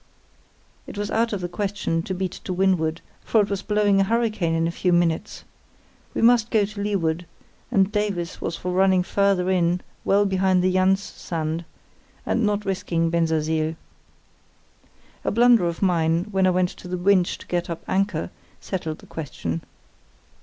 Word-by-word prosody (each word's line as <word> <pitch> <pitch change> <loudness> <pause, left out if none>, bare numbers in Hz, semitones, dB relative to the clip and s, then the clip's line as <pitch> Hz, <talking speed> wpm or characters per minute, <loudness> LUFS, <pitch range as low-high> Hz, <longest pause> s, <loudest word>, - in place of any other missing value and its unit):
It - - -9
was 205 0 -3
out 230 +1 +1
of 205 -3 -3
the 175 - -2
question 195 -3 -2
to 185 +3 -4
beat 185 -1 -2
to 185 - -2
windward, 175 -3 +1 0.2
for 225 - +2
it 205 - -2
was 200 -1 -1
blowing 205 -1 +2
a - - +5
hurricane 215 -6 0
in 165 0 +1
a 165 - 0
few 180 +1 0
minutes. 170 -2 0 0.7
We - - 0
must 235 -1 +5
go 215 -3 +3
to 205 0 -7
leeward, 175 -5 -1 0.4
and 195 0 +2
Davies 200 -5 -2
was 165 - -2
for 180 - -4
running 185 0 +3
farther 190 -1 +1
in 175 -1 +2 0.2
well 200 +1 +3
behind 190 -1 +2
the 185 0 +2
Jans 190 +1 +3
sand, 165 -2 -4 0.6
and 235 - 0
not 210 0 0
risking 170 -3 -1
Bensersiel. 160 -1 0 1.5
A - - 0
blunder 235 -4 +5
of 170 +3 -3
mine, 165 -2 +2
when 190 -1 +3
I - - +5
went 180 0 +2
to 180 - -11
the 180 0 -3
winch 185 0 +2
to - - -13
get 175 -1 -2
up 170 - -5
anchor, 195 +2 0 0.3
settled 165 -5 -4
the - - -16
question. 85 - -5
185 Hz, 170 wpm, -23 LUFS, 170-200 Hz, 1.5 s, a